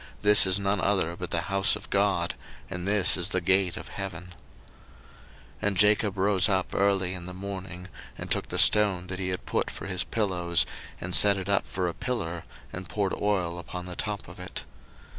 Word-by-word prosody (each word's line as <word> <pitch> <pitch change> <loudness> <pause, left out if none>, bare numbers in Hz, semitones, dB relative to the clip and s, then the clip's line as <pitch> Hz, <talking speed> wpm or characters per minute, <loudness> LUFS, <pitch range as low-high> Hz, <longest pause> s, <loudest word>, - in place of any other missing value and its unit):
this 105 -1 +6
is 95 0 +2
none 100 -1 0
other 95 -4 +1
but 90 0 -6
the 85 - -1
house 100 +3 +3
of - - -10
God, 100 -4 +1 0.4
and 90 +1 -5
this 100 -2 +3
is 90 +1 0
the 95 - +1
gate 95 0 +2
of - - -9
heaven. 90 -2 -6
01:028:018 - - -14 1.3
And 100 -2 0
Jacob 105 0 +3
rose 95 +1 +3
up 95 -2 0
early 95 -2 +1
in 90 -1 -7
the 90 - -8
morning, 95 -2 -7 0.3
and - - -7
took - - -1
the - - -3
stone 100 -4 +5
that 95 +1 -5
he 95 - -2
had 90 0 -3
put - - -1
for - - -8
his 95 -2 -1
pillows, 90 -6 +1 0.3
and 90 +1 -6
set 100 +1 +7
it 95 -1 -5
up 100 -1 +1
for 90 -1 -2
a 85 - -2
pillar, 85 -10 -4 0.3
and 90 0 -7
poured 100 -2 -1
oil 90 -4 -1
upon 90 +1 -7
the 90 -1 -7
top 105 +1 -4
of - - -12
it. - - -6
95 Hz, 200 wpm, -27 LUFS, 90-100 Hz, 1.3 s, set